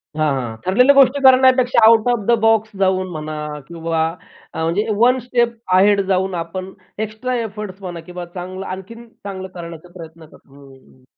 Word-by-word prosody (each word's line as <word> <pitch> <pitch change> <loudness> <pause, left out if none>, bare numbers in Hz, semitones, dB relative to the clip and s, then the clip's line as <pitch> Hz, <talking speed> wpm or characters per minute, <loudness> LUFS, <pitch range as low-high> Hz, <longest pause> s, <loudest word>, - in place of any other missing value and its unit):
हां, 155 -1 +1
हां, 120 -4 -4
ठरलेल्या 250 +9 +5
गोष्टी 275 +1 +4
करण्यापेक्षा 255 -2 +5
आउट 225 0 +5
ऑफ 240 - +1
द 235 -1 +4
बॉक्स 225 -1 +3
जाऊन 185 -1 +1
म्हणा 155 -1 -6 0.3
किंवा 165 -1 -2 0.5
अ, 160 - -3
म्हणजे 175 +7 0
वन 250 +3 +4
स्टेप 240 -1 -1 0.2
अहेड 200 +1 +4
जाऊन 190 0 0
आपण 185 +3 -5 0.4
एक्स्ट्रा 245 +4 -4
एफर्टस 210 -3 -7
म्हणा 175 -3 -6
किंवा 180 0 -7
चांगलं 185 +2 -8
आणखीन 205 +6 -8 0.2
चांगलं 190 -1 -6
करण्याचा 170 0 -9
प्रयत्न 165 -1 -12
करतो 145 -2 -21
हं, 140 -1 -16
हं. 130 -1 -23
190 Hz, 165 wpm, -19 LUFS, 170-230 Hz, 0.5 s, ठरलेल्या